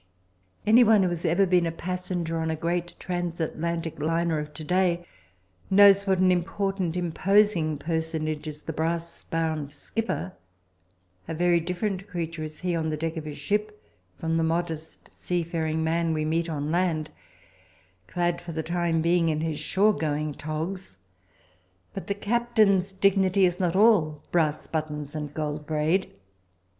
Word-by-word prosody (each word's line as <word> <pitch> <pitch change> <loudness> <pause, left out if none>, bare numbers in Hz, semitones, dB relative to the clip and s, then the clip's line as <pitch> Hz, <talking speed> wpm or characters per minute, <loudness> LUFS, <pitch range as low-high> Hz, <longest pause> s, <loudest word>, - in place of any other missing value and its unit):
Anyone 220 -2 +6
who 185 - +2
has 175 0 -4
ever 175 +4 +3
been 180 -2 +3
a - - -1
passenger 175 -1 -3
on 160 0 -1
a 160 - 0
great 175 +2 -3
transatlantic 170 -2 -3
liner 165 +1 +1
of 150 0 -6
to 155 - -6
day 175 0 +1 0.6
knows 200 0 +7
what 190 -1 +3
an 185 0 +4
important, 185 0 -1
imposing 180 -2 +2
personage 155 -1 -2
is 150 0 -7
the 160 - -5
brass 165 +2 -3
bound 160 -3 -2
skipper. 185 +4 -3 0.9
A 165 - -4
very 175 +1 +3
different 185 +3 -3
creature 165 -4 -4
is 155 0 -8
he 180 -1 0
on 160 -1 -1
the 155 - -2
deck 165 +2 -3
of 160 -2 -5
his 150 -1 -6
ship 210 +6 -2 0.4
from 165 0 -1
the 165 - +2
modest 160 -1 -3
seafaring 165 -2 -2
man 165 0 +1
we 155 0 -1
meet 165 +2 0
on 150 -1 -2
land, 165 -3 0 1.0
clad 175 -1 -1
for 170 - -7
the 160 0 -2
time 170 -1 0
being 170 0 +3
in 155 -1 0
his 160 -2 -2
shore 210 +3 +3
going 150 -3 -2
togs. 155 - -5 1.0
But - - -6
the 200 - -1
captain's 210 -3 +2
dignity 190 0 +3
is 175 -1 0
not 180 -2 +1
all 185 -8 +4
brass 155 -3 +1
buttons 150 -2 -4
and 150 -2 -4
gold 150 0 -4
braid. 160 +5 +1
170 Hz, 155 wpm, -26 LUFS, 155-185 Hz, 1.0 s, knows